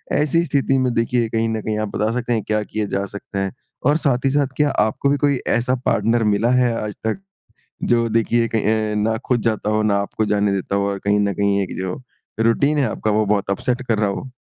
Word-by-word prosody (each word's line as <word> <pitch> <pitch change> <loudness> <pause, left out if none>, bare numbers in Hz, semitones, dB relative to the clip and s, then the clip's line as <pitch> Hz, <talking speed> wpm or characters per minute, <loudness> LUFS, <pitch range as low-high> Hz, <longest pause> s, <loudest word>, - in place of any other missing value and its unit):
ऐसी 155 +3 +2
स्थिति 135 -3 +1
में 130 -2 +1
देखिए 115 0 +1
कहीं 115 0 0
न 110 -1 -2
कहीं 110 0 -2
आप 110 - -1
बता 110 +1 +1
सकते 120 0 -1
हैं 110 -3 0
क्या 110 0 +1
किए 110 0 -3
जा 100 0 -2
सकते 100 0 -6
हैं? 95 0 -1 0.3
और 145 +3 +4
साथ 135 -5 0
ही - - +4
साथ 145 -1 +2
क्या 150 -1 +3 0.2
आपको 110 +5 -1
भी 145 - +2
कोई 140 -1 +2 0.2
ऐसा 125 +2 0
पार्टनर 115 0 +2
मिला 105 +2 +2
है 125 -2 +3
आज 105 -1 -5
तक 110 +10 -1 0.6
जो 115 -1 +2
देखिए 115 +1 +1
कहीं 110 -1 0
अ, - - -2
ना 110 +2 +1
खुद 125 -2 +1
जाता 110 -2 0
हो 110 0 +1
ना 105 -2 +2
आपको 110 +2 -2
जाने 105 -1 +1
देता 100 0 -2
हो 100 0 +1
और 100 - -3
कहीं 105 +1 +3
न 100 - -2
कहीं 100 0 +1
एक 95 - -5
जो 95 +3 -4 0.4
रूटीन 140 +6 +2
है 140 - +3
आपका 110 - -2
वो 105 0 +2
बहुत 100 -1 0
अपसेट 125 +6 -1
कर 110 -2 +2
रहा 105 -1 +2
हो? 115 +6 -5
110 Hz, 240 wpm, -20 LUFS, 105-125 Hz, 0.6 s, और